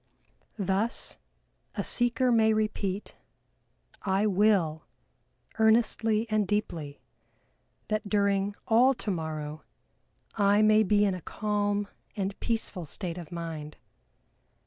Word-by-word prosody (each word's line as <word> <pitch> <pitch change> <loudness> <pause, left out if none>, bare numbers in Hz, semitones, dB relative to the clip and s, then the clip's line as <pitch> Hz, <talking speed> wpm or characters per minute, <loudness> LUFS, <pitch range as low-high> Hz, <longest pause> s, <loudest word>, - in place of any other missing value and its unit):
Thus 200 +3 0 0.6
a - - -2
seeker 245 +1 +3
may 220 -1 +4
repeat: 210 -2 -2 0.9
"I 195 +1 +1
will, 195 -6 +2 0.8
earnestly 220 0 +3
and 215 -2 +1
deeply, 165 -8 -3 0.9
that 215 -1 -2
during 200 -1 +1
all 250 +4 +5
tomorrow 155 -7 -4 0.7
I 205 0 +3
may 215 0 +5
be 210 0 +3
in 195 - +1
a 180 - -6
calm 205 +1 -1 0.3
and 195 0 -1
peaceful 210 -7 -3
state 175 +2 -5
of 170 -1 -10
mind. 165 -3 -6
205 Hz, 100 wpm, -28 LUFS, 180-215 Hz, 0.9 s, all